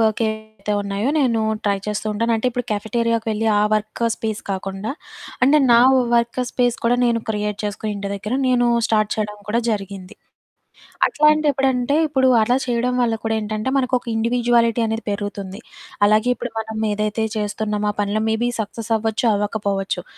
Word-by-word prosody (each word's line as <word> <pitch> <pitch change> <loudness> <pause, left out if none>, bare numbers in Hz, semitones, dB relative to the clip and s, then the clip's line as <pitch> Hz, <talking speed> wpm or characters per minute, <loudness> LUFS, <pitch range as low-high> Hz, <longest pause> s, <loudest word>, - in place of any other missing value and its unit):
వర్కేవయితే 220 -1 -1
ఉన్నాయో 200 +4 -2
నేనూ 240 -7 +2 0.2
ట్రై 200 -1 +2
చేస్తూ 210 0 -3
ఉంటాను. 230 +2 0
అంటే, 225 +3 -2
ఇప్పుడు 245 0 -3
కెఫెటేరియాకి 230 +2 -1
వెళ్ళి 220 +1 -1
ఆ - - +3
వర్క్ 215 +2 -3
స్పేస్ 220 -2 -4
కాకుండా, 195 +2 -4 0.5
అంటే, 280 +4 +6
నా 235 - +7 0.4
వర్క్ 235 +1 +1
స్పేస్ 245 -1 +1
కూడా 240 +1 +3
నేను 235 -1 +2
క్రియేట్ 210 -1 -2
చేసుకొని 210 +1 -3
ఇంటి 200 0 -4
దగ్గర, 210 +4 -4
నేనూ 245 -1 +3 0.2
స్టార్ట్ 215 -2 +1
చెయడం 210 -1 -3
కూడా 230 +3 +1
జరిగింది. 195 -2 -5 0.9
అట్లాంటెప్పుడంటే, 285 -3 +2
ఇప్పుడు 265 -3 +2
అలా 245 +4 +2
చెయ్యడం 245 0 0
వల్ల 230 -2 +1
కూడా 225 0 +1
ఏంటంటే, 215 +4 -3
మనకొక 255 -1 0
ఇండివిడ్యువాలిటీ 235 0 +2
అనేది 225 +1 -3
పెరుగుతుంది. 200 -1 -5 0.5
అలాగే 215 +3 +3
ఇప్పుడు 245 0 -6
మనం 220 0 -6
ఏదైతే 210 +1 -1
చేస్తున్నామో, 210 0 -1
ఆ - - -29
పనిలో 205 +1 -1
మేబీ 225 +2 0
సక్సస్సవ్వచ్చు, 225 +1 -2
అవ్వకపోవచ్చు. 200 -3 -2
220 Hz, 150 wpm, -21 LUFS, 210-240 Hz, 0.9 s, నా